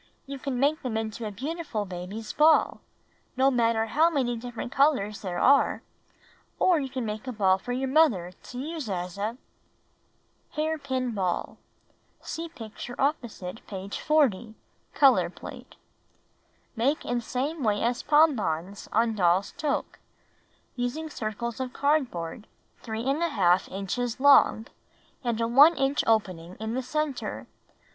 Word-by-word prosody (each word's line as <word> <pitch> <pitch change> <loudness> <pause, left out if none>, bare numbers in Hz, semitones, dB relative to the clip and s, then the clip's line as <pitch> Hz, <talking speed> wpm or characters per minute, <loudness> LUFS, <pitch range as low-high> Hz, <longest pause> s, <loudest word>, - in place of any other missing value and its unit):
"You 275 0 -7
can 260 -2 -3
make 290 +4 +2
them 235 -4 -2
into 220 0 -4
a - - -5
beautiful 275 - -4
baby^s 190 +4 -7
ball 310 +1 +4 0.3
— - - -39
no 265 +1 +4
matter 230 -2 +2
how 310 +9 +3
many 260 -7 0
different 240 +1 -6
colors 265 -9 +2
there 180 -3 -4
are; 280 +1 +3 0.7
or 360 -3 +4
you 270 -2 -3
can 255 -2 -4
make 215 +3 -5
a - - -2
ball 190 -4 +2
for 245 - -6
your 260 +2 -1
mother 260 - +3
to 245 +6 -12
use 300 -2 -5
as 180 0 -4
a 220 +4 -2 0.6
— - - -42
Hair 315 +1 -1
Pin 260 -3 -2
Ball* 185 -5 -2 0.6
(See 330 +1 -6
picture 240 -3 -8
opposite 235 - -2
page 195 0 -6
40 240 -8 +1 0.2
— - - -41
color 275 -2 +5
plate) - - -11 1.0
Make 265 +7 0
in 240 0 -1
same 275 +7 -3
way 210 -4 +1
as 240 +1 0
pompons 205 - +1
on 225 +1 +2
Doll's 185 -1 +2
Toque, 300 -1 -3 0.8
using 270 +6 -3
circles 225 +1 -4
of 255 -1 -4
cardboard 240 - -1 0.3
3^ 225 0 -5 0.6
inches 225 +5 -3
across, 265 -5 +5 0.5
and 235 -2 -1
a 230 - +1
1 285 +8 +7
inch 270 +1 +1
opening 185 -6 0
in 220 +1 -3
the 260 - -1
center. 290 +1 -3
240 Hz, 145 wpm, -27 LUFS, 210-280 Hz, 1.0 s, 1